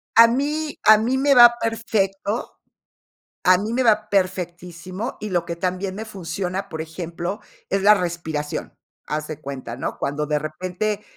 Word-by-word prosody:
A 230 0 +9
mí 295 +5 -1
a 215 0 +9
mí 240 +5 0
me 280 +1 +4
va 240 -2 +9
perfecto, 215 -2 -1 0.9
a 185 0 +6
mí 210 +4 -3
me 255 +2 +1
va 215 -3 +3
perfectísimo, 185 +2 -2
y 210 - -5
lo 175 -2 0
que 170 0 -5
también 185 +2 -2
me 215 +3 -5
funciona, 190 -1 -4
por 160 -4 -6
ejemplo, 170 +4 -5 0.3
es 195 0 +1
la 210 +2 +8
respiración. 170 -5 -3 0.3
Haz 150 0 -3
de 155 -2 -6
cuenta, 130 -4 -6
¿no? 130 - -4
Cuando 145 +2 -2
de 150 0 +1
repente 185 +7 -3
190 Hz, 160 wpm, -22 LUFS, 170-215 Hz, 0.9 s, A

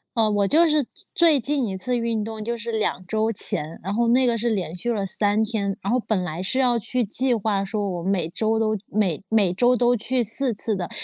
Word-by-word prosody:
哦， 225 -2 +2
我 205 -1 +1
就 325 +9 +4
是 305 -1 +3
最 240 - -10 0.4
最 275 - +2
近 275 -2 0
一 190 - -4
次 245 +7 -1
运 230 -2 -1
动 220 0 -6
就 235 +2 -3
是 230 0 -4
2 210 -4 -2
周 220 +3 0
前， 160 -4 -1
然 195 +2 -3
后 235 +2 +1
那 250 +3 +3
个 235 -2 +1
是 235 +2 0
连 185 -7 -2
续 180 +7 -4
了 200 -2 -2
3 205 +3 +1
天。 205 -3 -2
然 195 - -2
后 250 - +2
本 215 -5 -1
来 170 0 -5
是 190 +7 0
要 245 -3 +3
去 245 +3 -1
计 245 +5 +2
划 200 -2 -1
说， 205 0 -3
我 175 -2 -4
每 180 -2 -1
周 220 +5 0
都 215 -1 0
每 195 -6 0
每 210 -5 +2
周 245 +6 +3
都 245 +1 +3
去 245 +2 0
4 235 +3 +1
次 215 +2 -1
的。 185 -3 -4
220 Hz, 245 characters per minute, -23 LUFS, 195-240 Hz, 0.4 s, 就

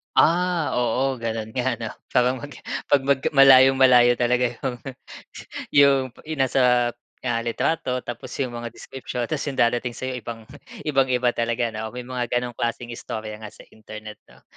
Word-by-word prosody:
Ah, 175 -1 +3
oo 130 +2 0
gano'n 115 -2 -4
nga, 130 +1 +1
'no? 115 -1 -5 0.2
Parang 125 +1 +3
mag 145 +2 -9 0.3
pag 145 - +3
mag 140 0 +2 0.2
malayong-malayo 130 -2 +7
talaga 125 +1 +1
'yong, 125 0 -4 0.9
'yong, 140 -1 +5 0.2
'yong 155 -1 -5
nasa, 125 -2 +3 0.3
ah, 120 -2 0
litrato, 125 +2 -1
tapos 120 +2 -7
'yong 130 -3 -2
mga 120 - -6
description, 125 -2 -6
tapos 155 -2 -2
'yong 140 - -3
darating 120 +1 0
sa'yo, 130 0 -4
ibang, 115 -1 -8 0.4
ibang-iba 130 -4 +2
talaga 120 0 -1
'no? 110 +1 -6
May 125 - -5
mga 125 0 -3
gano'ng 120 -1 -2
klaseng 120 0 -3
istorya 110 -2 -6
nga, 110 - -8
sa - - -14
Internet 110 0 -10
'no? - - -21
125 Hz, 155 wpm, -23 LUFS, 120-135 Hz, 0.9 s, malayong-malayo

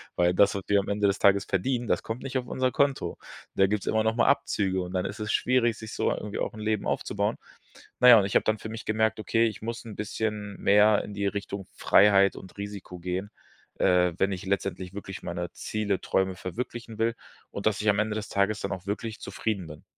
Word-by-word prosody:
Weil 90 0 +3
das, 100 +3 +4
was 100 - -3
wir 100 0 +4
am 100 - -3
Ende 100 0 0
des 100 +1 0
Tages 100 0 +4
verdienen, 120 +5 -1
das - - +1
kommt 110 +3 -5
nicht 135 -1 -2
auf 125 - -3
unser 130 0 0
Konto. 140 -11 0 0.4
Da 95 - +4
gibt's 105 0 -2
immer 110 0 +2
noch 110 +1 +1
mal 120 - +3
Abzüge 95 -2 +1
und 90 +1 -6
dann 90 - 0
ist - - -5
es 105 0 -2
schwierig, 120 -3 +2
sich 110 0 -8
so - - 0
irgendwie 105 0 -4
auch - - -2
'n 110 - -9
Leben 110 -1 -1
aufzubauen. - - -1 0.6
Na 125 - +8
ja, 120 - +11
und 100 - +1
ich 100 - -4
habe - - +5
dann 110 0 +1
für 110 - -7
mich 115 0 -7
gemerkt, 110 0 +1
okay, 115 +1 +2
ich 110 - -6
muss 115 +2 -5
'n 110 -3 -8
bisschen 105 -1 -3
mehr 105 +1 +5
in 105 - -8
die 100 0 -1
Richtung 100 -1 -4
Freiheit 100 -1 +5
und 95 - -12
Risiko 100 -3 -7
gehen, 90 +3 -3 0.5
äh, 90 -1 +3
wenn 95 +1 +1
ich 95 +1 -5
letztendlich 95 -2 -2
wirklich 100 -1 -7
meine 85 0 -4
Ziele 105 -3 -2
Träume 95 0 0
verwirklichen 115 +4 -6
will 115 +1 +1 0.4
und 100 - -2
dass 110 0 +1
ich 105 - +2
am 100 - +3
Ende 110 0 0
des 110 -1 -4
Tages 100 +1 +1
dann - - -3
auch 95 0 -6
wirklich 110 +2 -4
zufrieden 100 -6 -3
bin. 75 -1 -11
105 Hz, 230 wpm, -27 LUFS, 95-110 Hz, 0.6 s, ja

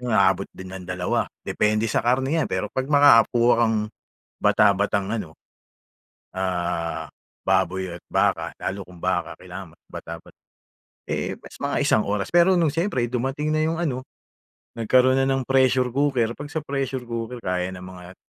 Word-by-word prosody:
Inaabot 100 -6 +2
din 95 0 -10
ng 90 -2 -8
2, 90 0 -1 0.2
depende 105 +1 +1
sa 105 - +1
karne 135 +6 +1
yan - - -3
pero - - -1
'pag 130 0 -2
makakakuha 120 -5 +6
kang, 115 -1 +2 0.6
bata-batang 100 -1 +3
ano, 95 -9 -4 1.0
ah, 90 -3 -2 0.4
baboy 95 0 +1
at - - -16
baka, - - +1
lalo 95 0 -3
kung 90 -2 -14
baka, - - -1
kailangan - - -9 0.2
bata-bata. 85 0 -9 0.7
Eh, - - -2
mas - - -13
mga - - -2
1 110 - +3
oras. 100 0 -1
Pero 175 +2 +5
nung 165 -4 +3
siyempre 165 -7 0
dumating 135 +5 -1
na 155 - +2
yung 165 +1 -1
ano, 130 -6 -1 0.8
nagkaroon 130 +3 +4
na 135 - +2
ng 135 -1 +1
pressure 130 -1 +3
cooker 130 -4 +1
'pag 145 0 -8
sa 160 - -2
pressure 135 -3 -3
cooker 115 +1 -4
kaya 90 0 -1
ng 90 - -9
mga 90 0 -11
115 Hz, 155 wpm, -24 LUFS, 95-135 Hz, 1.0 s, makakakuha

